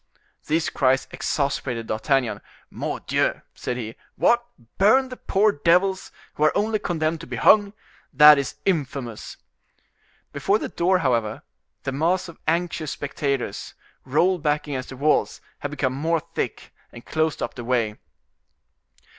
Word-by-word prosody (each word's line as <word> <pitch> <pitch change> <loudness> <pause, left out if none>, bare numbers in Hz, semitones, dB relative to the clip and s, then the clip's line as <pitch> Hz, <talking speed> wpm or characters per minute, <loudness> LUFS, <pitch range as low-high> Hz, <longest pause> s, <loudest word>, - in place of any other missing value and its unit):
These 160 +2 +1
cries 135 -1 +2
exasperated 130 -5 -2
D'Artagnan. 115 -1 0 0.3
"Mordioux!" - - -1
said 125 - -4
he. 115 -2 -6 0.2
"What! 240 0 +3 0.4
burn 260 +7 +5
the 255 - -7
poor 205 +2 +2
devils 180 +4 +2 0.2
who 150 - -2
are 155 - +3
only 215 +1 +1
condemned 160 -3 -1
to 165 - -10
be - - -5
hung? 205 -1 +5 0.4
that 150 -1 +8
is 140 - -3
infamous!" 140 - -2 1.0
Before 170 +9 +2
the - - -5
door, 185 +2 +2
however, 115 -8 0 0.4
the 135 - -2
mass 175 +7 0
of 170 - -12
anxious 165 -1 0
spectators, 140 -6 -3 0.3
rolled 170 +6 +2
back 150 -1 0
against 130 -3 -4
the 130 - -9
walls, 150 +3 +1 0.2
had 145 - -4
become 135 -3 -1
more 160 +5 0
thick, 165 +1 -5 0.2
and 120 - -12
closed 160 0 -1
up - - -3
the 120 - -7
way. 115 -3 0
150 Hz, 140 wpm, -23 LUFS, 130-175 Hz, 1.0 s, that